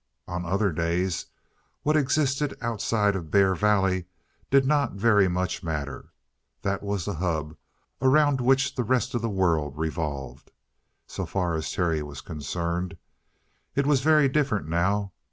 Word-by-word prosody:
On 90 Hz, 0 st, -4 dB
other 100 Hz, +2 st, +1 dB
days 85 Hz, +2 st, -1 dB, 0.6 s
what 150 Hz, +1 st, +2 dB
existed 145 Hz, -1 st, +1 dB
outside 110 Hz, -3 st, 0 dB
of 85 Hz, -5 st, -5 dB
Bear 95 Hz, +2 st, +4 dB
Valley 95 Hz, -2 st, +2 dB, 0.4 s
did 135 Hz, 0 st, +4 dB
not 145 Hz, +1 st, +2 dB
very 105 Hz, -1 st, +4 dB
much 90 Hz, +1 st, -1 dB
matter. 75 Hz, -5 st, -5 dB, 0.5 s
That 100 Hz, 0 st, -1 dB
was 100 Hz, -4 st, -2 dB
the -, -, -2 dB
hub 80 Hz, -3 st, -2 dB, 0.5 s
around 140 Hz, 0 st, +4 dB
which 135 Hz, +2 st, +3 dB
the 130 Hz, -3 st, -1 dB
rest 125 Hz, +2 st, 0 dB
of 120 Hz, -, -1 dB
the 115 Hz, -, -1 dB
world 80 Hz, -8 st, 0 dB
revolved, 75 Hz, -5 st, -4 dB, 0.6 s
so -, -, -5 dB
far 90 Hz, -3 st, -1 dB
as 80 Hz, -1 st, -2 dB
Terry 80 Hz, -4 st, 0 dB
was 75 Hz, -2 st, -7 dB
concerned. 85 Hz, +4 st, -3 dB, 0.8 s
It 140 Hz, -, +2 dB
was 140 Hz, -2 st, +3 dB
very 155 Hz, -1 st, +5 dB
different 135 Hz, -, 0 dB
now. 95 Hz, +4 st, 0 dB
95 Hz, 145 wpm, -26 LUFS, 85-125 Hz, 0.8 s, very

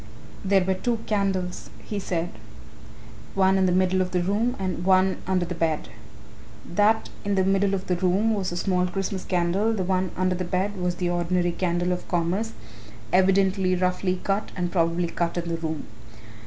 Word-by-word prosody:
"There 195 Hz, -1 st, +3 dB
were 190 Hz, +1 st, +1 dB
two 230 Hz, +5 st, -1 dB
candles," 195 Hz, -4 st, -1 dB, 0.2 s
he 210 Hz, -, -3 dB
said, 175 Hz, -3 st, -2 dB, 1.1 s
"one 190 Hz, 0 st, +4 dB
in 190 Hz, -1 st, +3 dB
the -, -, +2 dB
middle 185 Hz, +1 st, +2 dB
of 185 Hz, -, 0 dB
the 180 Hz, -1 st, 0 dB
room 215 Hz, +6 st, +1 dB
and 185 Hz, -2 st, -3 dB
one 190 Hz, 0 st, +4 dB
under 185 Hz, -2 st, +1 dB
the 175 Hz, -, -4 dB
bed. 165 Hz, -6 st, -1 dB, 0.8 s
That 210 Hz, +5 st, +2 dB
in 205 Hz, 0 st, 0 dB
the 190 Hz, -, +3 dB
middle 195 Hz, +1 st, +2 dB
of 190 Hz, 0 st, -5 dB
the 180 Hz, -, 0 dB
room 190 Hz, +5 st, +2 dB
was 195 Hz, -4 st, -1 dB
a 175 Hz, -, -4 dB
small 180 Hz, 0 st, +1 dB
Christmas 195 Hz, 0 st, -3 dB
candle, 185 Hz, +5 st, +1 dB
the 200 Hz, -4 st, -1 dB
one 185 Hz, 0 st, 0 dB
under 185 Hz, 0 st, +2 dB
the 180 Hz, 0 st, -2 dB
bed 185 Hz, +3 st, -1 dB
was 180 Hz, -2 st, -1 dB
the 175 Hz, 0 st, -1 dB
ordinary 175 Hz, 0 st, +1 dB
candle 175 Hz, 0 st, 0 dB
of 180 Hz, -, -3 dB
commerce 185 Hz, +6 st, -1 dB, 0.6 s
evidently 190 Hz, 0 st, +3 dB
roughly 180 Hz, 0 st, 0 dB
cut 200 Hz, +1 st, -1 dB
and 175 Hz, -2 st, -2 dB
probably 170 Hz, 0 st, +1 dB
cut 170 Hz, +1 st, -2 dB
in 170 Hz, -1 st, -2 dB
the 165 Hz, -1 st, -1 dB
room. 160 Hz, -2 st, -4 dB
185 Hz, 180 wpm, -25 LUFS, 175-195 Hz, 1.1 s, one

